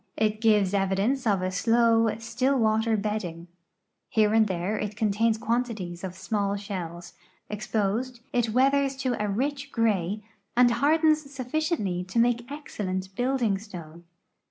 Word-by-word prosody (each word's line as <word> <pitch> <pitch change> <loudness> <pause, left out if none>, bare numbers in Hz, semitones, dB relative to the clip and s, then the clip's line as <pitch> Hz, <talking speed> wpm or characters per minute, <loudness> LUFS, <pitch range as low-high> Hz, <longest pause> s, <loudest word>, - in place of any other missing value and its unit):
It 215 0 0
gives 210 -4 +3
evidence 200 +7 +1
of 195 -3 +2
a 185 - -1
slow, 230 +2 +3
still 240 +4 0
water 220 -1 +2
bedding. 200 -5 -3 0.6
Here 215 -1 +3
and 220 -1 +5
there 185 +2 -2
it 210 0 -3
contains 220 +1 +2
quantities 220 -7 -2
of 185 -1 -5
small 200 0 -1
shells; 180 -4 -6 0.4
exposed, 215 +4 -2
it 240 -2 +1
weathers 275 +3 +2
to 265 -2 -1
a - - 0
rich 280 +6 -2
gray 210 -3 0 0.3
and 245 -1 +6
hardens 310 +5 +3
suffi 275 +1 -3
ciently 195 - -1
to 190 - -5
make 240 +2 +2
excellent 190 -10 -4
building 245 -5 +1
stone. 170 -5 -10
220 Hz, 140 wpm, -26 LUFS, 195-245 Hz, 0.6 s, and